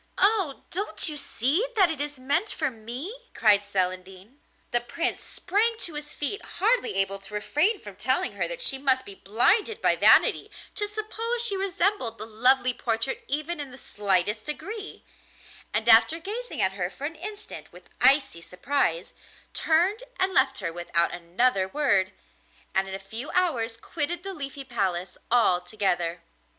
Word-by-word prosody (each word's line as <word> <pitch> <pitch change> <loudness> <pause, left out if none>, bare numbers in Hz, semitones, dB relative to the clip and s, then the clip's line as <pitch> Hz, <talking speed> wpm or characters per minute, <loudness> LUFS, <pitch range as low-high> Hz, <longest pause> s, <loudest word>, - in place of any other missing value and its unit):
'Oh! 390 -8 +1
don't 395 +1 +1
you 305 - -3
see 285 - -1
that 380 -6 +4
it 300 -3 -5
is 290 -1 -4
meant 285 +11 -1
for 310 -7 -1
me?' 245 - -8 0.2
cried 210 -3 +4
Celandine. 190 +4 -4 0.3
The 240 -1 +3
Prince 330 +8 -3
sprang 445 +4 0
to 340 - -3
his 295 0 -7
feet, 350 +8 0
hardly 465 - +1
able 195 0 -1
to 195 +2 -6
refrain 305 - +1
from - - -11
telling - - +2
her - - -2
that - - -4
she 275 - +7
must 260 -1 +2
be 200 - -6
blinded 310 - +3
by - - +3
vanity - - +4 0.2
to 415 - -3
suppose 445 +3 -2
she 410 -4 +2
resembled 385 - 0
the 215 - -7
lovely 250 +3 +2
portrait 230 +2 -3
even 305 +4 -3
in 285 -2 -6
the 255 - -13
slightest 205 -1 +2
degree; 405 +7 -6 0.7
and 220 +2 -1
after 235 +8 +6
gazing 450 +8 -3
at 190 - +4
her 185 -2 -3
for 270 +8 -8
an 315 - -4
instant 415 +6 -9
with - - -17
icy 270 - +6
surprise, 180 - -2 0.4
turned 355 +8 +1 0.2
and 375 0 0
left 270 -2 +2
her 170 -5 -4
without 170 0 -1
another 185 +4 0
word, 200 -7 +1 0.6
and 190 0 +2
in 190 - -5
a - - -4
few 220 +8 -5
hours 250 -11 0
quitted 335 +7 -4
the 390 0 -6
Leafy 280 -4 -7
Palace 190 -8 -3
altogether. 180 -5 0
265 Hz, 160 wpm, -25 LUFS, -, 0.7 s, she